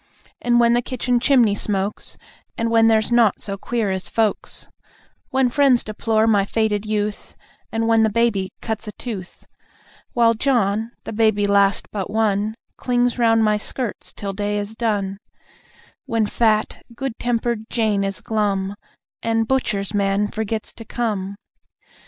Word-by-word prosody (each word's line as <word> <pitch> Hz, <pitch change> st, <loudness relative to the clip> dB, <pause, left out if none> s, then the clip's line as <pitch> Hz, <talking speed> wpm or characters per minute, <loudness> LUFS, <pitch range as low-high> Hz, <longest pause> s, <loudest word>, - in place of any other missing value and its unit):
And 240 Hz, 0 st, +3 dB
when 235 Hz, 0 st, +5 dB
the 240 Hz, -, +3 dB
kitchen 250 Hz, 0 st, 0 dB
chimney 245 Hz, -5 st, +4 dB
smokes, 205 Hz, 0 st, -2 dB, 0.4 s
And 230 Hz, 0 st, -1 dB
when 225 Hz, 0 st, +5 dB
there's 220 Hz, 0 st, +3 dB
naught 235 Hz, -4 st, +4 dB
so 200 Hz, -, -3 dB
"queer" 220 Hz, 0 st, -2 dB
as 190 Hz, 0 st, -1 dB
folks! 220 Hz, -3 st, -1 dB, 0.6 s
When 265 Hz, -1 st, +2 dB
friends 260 Hz, -1 st, +3 dB
deplore 220 Hz, +1 st, 0 dB
my 210 Hz, -3 st, +4 dB
faded 215 Hz, 0 st, 0 dB
youth, 210 Hz, -1 st, -3 dB, 0.4 s
And 225 Hz, 0 st, 0 dB
when 225 Hz, -1 st, +4 dB
the 220 Hz, -, +4 dB
baby 210 Hz, -4 st, +1 dB
cuts 220 Hz, -1 st, -4 dB
a 210 Hz, -, -6 dB
tooth. 200 Hz, -6 st, -7 dB, 0.7 s
While 230 Hz, -1 st, +4 dB
John, 225 Hz, -3 st, +1 dB
the -, -, -6 dB
baby 215 Hz, -2 st, +2 dB
last 200 Hz, 0 st, +2 dB
but 195 Hz, -3 st, -3 dB
one, 215 Hz, -1 st, 0 dB, 0.2 s
Clings 245 Hz, 0 st, 0 dB
round 225 Hz, -1 st, +4 dB
my 210 Hz, -1 st, +3 dB
skirts 235 Hz, +2 st, -4 dB
till 200 Hz, -1 st, -5 dB
day 205 Hz, +1 st, -2 dB
is 205 Hz, +1 st, -3 dB
done; 200 Hz, -4 st, -1 dB, 0.9 s
When 230 Hz, -1 st, +1 dB
fat, 215 Hz, 0 st, +1 dB
good 270 Hz, -2 st, -4 dB
tempered 235 Hz, -2 st, -1 dB
Jane 215 Hz, -4 st, +1 dB
is 195 Hz, 0 st, -3 dB
glum, 200 Hz, -3 st, -1 dB, 0.5 s
And 225 Hz, 0 st, 0 dB
butcher's 215 Hz, -7 st, 0 dB
man 200 Hz, 0 st, +1 dB
forgets 220 Hz, 0 st, -4 dB
to 225 Hz, -, -10 dB
come. 205 Hz, -5 st, -3 dB
220 Hz, 150 wpm, -21 LUFS, 205-235 Hz, 0.9 s, when